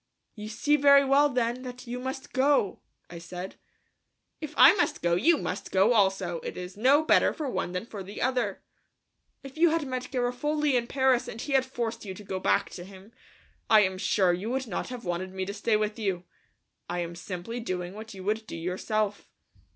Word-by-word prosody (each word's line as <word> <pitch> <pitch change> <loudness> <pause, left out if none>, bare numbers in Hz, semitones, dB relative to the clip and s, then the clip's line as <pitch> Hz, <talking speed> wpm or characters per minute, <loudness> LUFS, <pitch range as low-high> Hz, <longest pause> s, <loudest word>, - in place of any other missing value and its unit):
"You 210 -1 -8
see 295 +7 +2
very 280 -1 +6
well, 280 +2 +4
then, 245 -1 -1
that 250 0 -8
you 245 +1 -5
must 265 +2 -6
go," 265 -7 +2 0.3
I 170 - -8
said. 180 +2 -8 0.8
"If 305 -1 -7
I 310 - +9
must 390 - -1
go, 170 0 +2
you 300 - +4
must - - -4
go 195 +5 +4
also; 190 -5 +1
it - - -7
is 180 +1 -7
no 265 +8 +4
better - - +4
for 305 - -4
one 180 -8 -3
than 180 +4 -3
for 215 -4 -8
the 195 +2 -8
other." 245 -6 -1 0.8
"If 275 +3 -10
you 340 0 +6
had 320 -1 0
met 255 -1 -4
Garofoli 280 +4 0
in 235 -1 +1
Paris 260 -2 +2
and 225 - -7
he 280 - -4
had 265 -1 +4
forced 230 -3 -4
you 190 -3 -6
to 210 - -11
go 190 -1 -4
back - - +1
to 175 - -8
him, 195 +3 -14 0.6
I 215 -1 +7
am 190 -2 0
sure 185 -2 +2
you 190 +6 -3
would 265 +1 -1
not 210 - -4
have 250 -2 -7
wanted 180 +2 -3
me 190 0 -2
to 200 - -5
stay 215 +1 +1
with 210 +1 -2
you. 190 -5 -2 0.7
I 175 0 -2
am 170 0 -5
simply 180 +6 -6
doing 180 -5 -4
what 215 0 -9
you 190 - -9
would 215 +2 -2
do - - -7
yourself." 200 +4 -2
220 Hz, 205 wpm, -27 LUFS, 190-260 Hz, 0.8 s, I